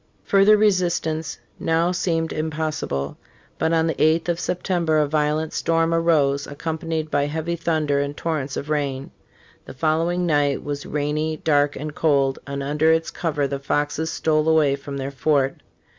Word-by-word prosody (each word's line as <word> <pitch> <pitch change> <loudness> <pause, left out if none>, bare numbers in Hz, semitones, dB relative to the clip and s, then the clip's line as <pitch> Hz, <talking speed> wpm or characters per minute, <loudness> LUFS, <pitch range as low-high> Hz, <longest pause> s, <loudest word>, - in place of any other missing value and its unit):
Further 200 +2 +5
resistance 175 -6 0 0.2
now 165 +2 +1
seemed 165 -2 -1
impossi 155 0 -2
ble. 70 +1 -3 0.4
But 160 - +1
on 165 -1 +3
the 160 - 0
8th 160 +3 +2
of 170 0 0
September 175 -3 0
a 150 - +3
violent 150 +1 0
storm 165 0 +1
arose, 150 -4 +2
accompanied 160 +1 -4
by 145 0 +1
heavy 160 +3 -2
thunder 155 -4 0
and 140 +1 -3
torrents 150 -5 -2
of 145 +2 -5
rain. 140 -2 -2 0.5
The - - -10
following 165 +5 +1
night 145 -4 +1
was 145 0 -5
rainy, 150 +2 -1
dark 145 -2 +2
and 150 +1 -5
cold; 140 -4 +1
and 140 0 -4
under 150 +3 +2
its 160 0 +1
cover 150 -4 -1
the 140 0 -3
Foxes 145 +3 -1
stole 155 0 +1
away 155 -3 +4
from 140 0 -7
their 135 0 -4
fort. 140 0 0
155 Hz, 160 wpm, -22 LUFS, 145-165 Hz, 0.5 s, Further